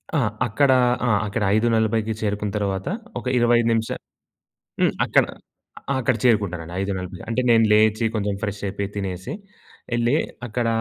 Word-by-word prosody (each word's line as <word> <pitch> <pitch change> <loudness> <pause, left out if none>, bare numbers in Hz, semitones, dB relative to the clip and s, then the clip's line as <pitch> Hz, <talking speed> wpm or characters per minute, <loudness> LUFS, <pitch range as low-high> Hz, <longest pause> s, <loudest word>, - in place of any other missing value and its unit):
ఆ! - - +3 0.3
అక్కడ 135 +5 +3 0.4
ఆ! - - +2 0.2
అక్కడ 105 +2 -2
5:40 110 -1 +1
చేరుకున్న 105 -1 -1
తర్వాత 95 -2 -2 0.3
ఒక - - -12
25 120 -1 +3
నిమిషాలు 115 0 -2 0.8
హ్మ్. - - +3
అక్కడ - - +3 0.7
ఆ! - - +3
అక్కడ 130 0 +1
చేరుకుంటానండి 95 -8 +1
5:40 95 -2 -4
అంటే 115 +2 +1
నేను 115 -1 +5
లేచి 110 +1 +3
కొంచెం 105 -1 -1
ఫ్రెష్ 100 -1 -3
అయిపోయి, 100 0 -3
తినేసి, 95 -2 -4 0.6
ఎళ్ళి 120 +3 +2 0.3
అక్కడ 120 +1 -1
110 Hz, 140 wpm, -23 LUFS, 100-115 Hz, 0.8 s, నేను